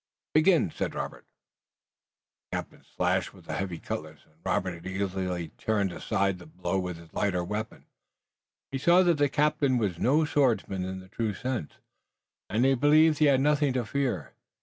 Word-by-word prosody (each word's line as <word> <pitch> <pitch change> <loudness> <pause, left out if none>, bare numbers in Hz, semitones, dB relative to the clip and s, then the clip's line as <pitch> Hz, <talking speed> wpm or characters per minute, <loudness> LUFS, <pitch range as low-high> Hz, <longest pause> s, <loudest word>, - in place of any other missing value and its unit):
"Begin!" 155 - +4
said - - -3
Robert. - - -5 1.2
The - - -2
captain - - -8
slashed - - 0
with - - -16
the - - -5
heavy 95 -3 -3
cutlass, 80 -2 -6
and 75 - -29
Robert 90 -3 -1
easily 95 -3 -2
turned 100 -4 0
aside 95 +1 -1
the 90 - -12
blow 90 +3 -2
with 90 -2 -4
his 85 -1 -15
lighter 95 -4 0
weapon. 105 +5 -5 0.9
He 135 - -2
saw 175 +6 +5
then 175 - +3
that 170 - +3
the 145 -1 +3
captain 145 -2 +2
was 100 -7 -1
no 150 +5 +3
swordsman 120 -10 +1
in 95 0 -5
the 95 - -14
true 110 -1 -2
sense, 125 - -3 0.8
and 115 +4 +2
he 135 - +5
believed 150 +3 +5
he 155 - +5
had 135 -2 +4
nothing 145 -1 +2
to 125 -2 -1
fear. 110 - -2
105 Hz, 170 wpm, -28 LUFS, 90-140 Hz, 1.2 s, saw